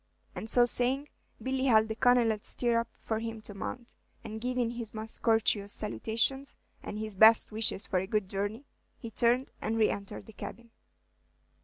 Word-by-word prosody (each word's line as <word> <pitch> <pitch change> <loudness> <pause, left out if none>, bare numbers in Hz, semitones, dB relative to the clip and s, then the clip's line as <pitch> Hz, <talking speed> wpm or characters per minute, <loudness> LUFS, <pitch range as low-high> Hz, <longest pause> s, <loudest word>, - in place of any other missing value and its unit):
And 220 - -6
so 245 +1 +6
saying, 260 +4 -1 0.3
Billy 260 0 -1
held 220 -4 +5
the 220 - -3
Colonel's 230 -3 +2
stirrup 235 -1 +1
for 220 -1 -2
him 225 0 -5
to 210 - -7
mount, 235 +5 -7 0.3
and 220 -1 -7
giving 250 -1 -1
his 235 -2 -5
most 220 +1 -7
courteous 220 -3 +2
salutation, 230 - -1 0.3
and 210 - -6
his 215 0 -5
best 220 +4 +6
wishes 215 -2 +3
for 185 - 0
a 190 - -4
good 210 -2 0
journey, 205 +7 -3 0.3
he 230 -3 -8
turned 245 +4 +2
and 225 +1 -1
re 220 -1 +3
entered 200 -1 -6
the 220 - -13
cabin. 235 +2 -9
225 Hz, 170 wpm, -30 LUFS, 215-245 Hz, 0.3 s, so